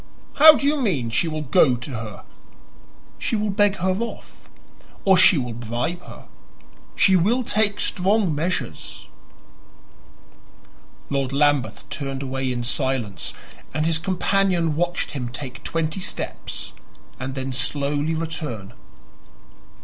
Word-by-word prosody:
"How 310 +1 +10
do 280 - -2
you 290 0 +2
mean 140 - 0
she 140 +9 +2
will 155 -1 -3
go 140 -2 +4
to 125 +4 -6
her?" 110 -4 -7 1.0
"She - - -1
will 210 -1 0
beg 205 0 +3
her 185 0 0
off, 235 0 -7 0.6
or 190 -1 +6
she 185 -1 +7
will 125 -3 -2
bribe 120 +9 -3
her. - - -13 0.7
She 190 - +5
will 220 +9 +2
take 210 -2 +1
strong 195 -1 +1
measures." 170 +5 -3 2.0
Lord 135 -2 0
Lambeth 145 -1 +1
turned 135 -1 -4
away 135 -1 -2
in 120 -1 -2
silence, 130 -5 -1 0.4
and 155 +1 +1
his 160 -1 +2
companion 180 -2 +1
watched 175 +2 -1
him 125 -4 -4
take 130 0 -7
twenty 165 +2 -2
steps - - -5 0.5
and 130 +1 -5
then 130 0 -3
slowly 145 +4 0
return. 155 -11 -4
155 Hz, 125 wpm, -23 LUFS, 130-185 Hz, 2.0 s, How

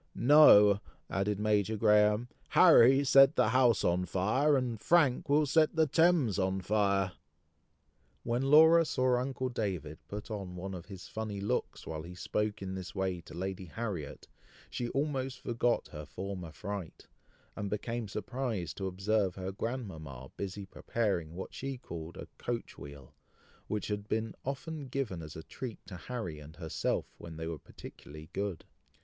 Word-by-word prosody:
"No," 105 -8 +7 0.3
added 100 +1 0
Major 105 0 +1
Graham; 105 +2 +4 0.2
"Harry 135 -6 +7
set 135 +1 +6
the - - +3
house 125 -3 +4
on 90 +1 +1
fire, 130 - +2
and 120 -4 -2
Frank 150 -8 +3
will 150 +1 +4
set 155 +3 +3
the 160 -1 +4
Thames 155 - +3
on 95 0 0
fire!" 100 -1 +1 1.1
When 120 +1 0
Laura 160 +4 +7
saw 130 -5 +1
uncle 130 0 -2
David 90 - -3
put 105 +2 -7
on 95 -4 -5
one 95 +2 -5
of 90 -3 -8
his 95 -2 -9
funny 110 -2 -5
looks, 100 +1 -2
while 80 -1 -5
he 85 +2 -10
spoke 105 +2 -2
in 95 0 -4
this 95 0 -7
way 95 -2 -1
to 80 - -12
Lady 95 +1 -4
Harriet, 90 -6 -5 0.4
she 120 -1 -3
almost 135 -2 -2
forgot 120 0 0
her 75 -2 -8
former 90 +1 -6
fright, 90 +3 -7 0.5
and 100 -1 -4
became 115 +2 -3
surprised 105 - -4
to 95 - -2
observe 95 +1 0
her 95 0 -4
grandmama 85 - -6
busy 100 0 -5
preparing 95 -5 -2
what 95 - -7
she 135 0 -5
called 85 -7 -8
a - - -8
coach 120 -1 -4
wheel, 70 -2 -11 0.5
which 105 -1 -2
had 105 0 -3
been 110 0 -2
often 140 +2 -5
given 125 - -3
as 75 -1 -9
a 80 - -8
treat 120 +3 -7
to 95 - -9
Harry 90 -4 -5
and 75 +1 -12
herself 80 -1 -2
when 80 -2 -9
they 80 - -4
were 80 -2 -4
particularly 75 +3 -12
good. 100 -5 -3
105 Hz, 160 wpm, -31 LUFS, 90-125 Hz, 1.1 s, No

